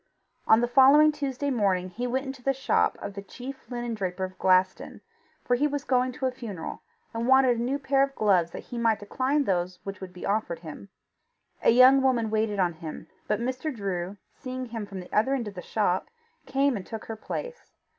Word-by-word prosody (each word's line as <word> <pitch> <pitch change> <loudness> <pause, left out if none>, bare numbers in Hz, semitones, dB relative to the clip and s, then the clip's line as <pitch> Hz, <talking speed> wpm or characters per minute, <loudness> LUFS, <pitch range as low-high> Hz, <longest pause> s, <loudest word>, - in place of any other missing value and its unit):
On 220 +1 +6
the 240 - +2
following 275 +5 +7
Tuesday 285 -1 -3
morning 190 -6 +1
he 245 +6 -3
went 260 +3 -1
into 265 -1 -7
the 270 +2 +1
shop 270 0 +1
of 200 - -5
the 200 - -6
chief 265 +6 -10
linen 240 -1 -3
draper 190 -3 -3
of 185 0 -5
Glaston, 185 0 +2 0.4
for 245 - +1
he 290 +4 +2
was 290 -1 -3
going 255 -2 +1
to 265 +1 -4
a 260 - +1
funeral, 220 -10 -7 0.3
and 230 +1 -2
wanted 260 -2 +5
a - - -1
new 260 +4 0
pair 275 -1 +1
of 275 0 +1
gloves 185 -6 +3
that - - -8
he 240 - -6
might 225 -2 +3
decline 260 +8 0
those 180 -4 -1
which 195 -1 -7
would 185 -1 -7
be 180 - -8
offered 200 -5 -1
him. 165 +4 -9 0.7
A - - +4
young 255 +3 +7
woman 240 -5 +1
waited 215 -1 0
on 180 -3 +1
him, 160 -1 -9 0.2
but 210 0 0
Mr. 255 +5 -2
Drew, 195 -4 -4 0.2
seeing 255 -1 -6
him 225 -3 -6
from 195 -2 -7
the 180 - -13
other 245 +6 +3
end 240 -5 -3
of 205 - -6
the 180 - -7
shop, 190 -3 0 0.4
came 275 0 +2
and 195 - -4
took 220 +3 -7
her 225 - -5
place. 485 - -7
235 Hz, 215 wpm, -27 LUFS, 195-265 Hz, 0.7 s, following